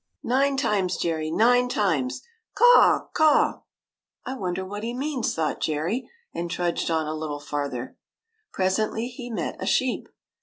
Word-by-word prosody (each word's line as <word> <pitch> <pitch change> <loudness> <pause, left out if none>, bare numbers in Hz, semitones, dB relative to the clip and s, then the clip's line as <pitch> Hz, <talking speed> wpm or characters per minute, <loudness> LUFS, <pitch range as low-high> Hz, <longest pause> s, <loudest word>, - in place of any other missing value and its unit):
" - - -53
Nine 275 +2 +2
times, 195 -8 0
Jerry, 160 -2 -1
nine 245 +8 +3
times! 165 - 0 0.3
Caw, - - +6
caw! 310 -1 +4 0.2
" - - -68
" - - -49
I 260 - -3
wonder 190 -4 -3
what 205 +2 -6
he 235 +2 -4
means," 270 -2 -2
thought 160 -2 -1
Jerry, 165 - -1 0.2
and 170 0 -3
trudged 175 -1 -1
on 160 -1 +1
a 155 - -3
little 155 -2 -4
farther. 145 -4 -4 0.5
Presently 215 +5 0
he 245 -1 -8
met 225 - -3
a - - -3
sheep. 260 -1 0
195 Hz, 160 wpm, -25 LUFS, 160-245 Hz, 0.5 s, Caw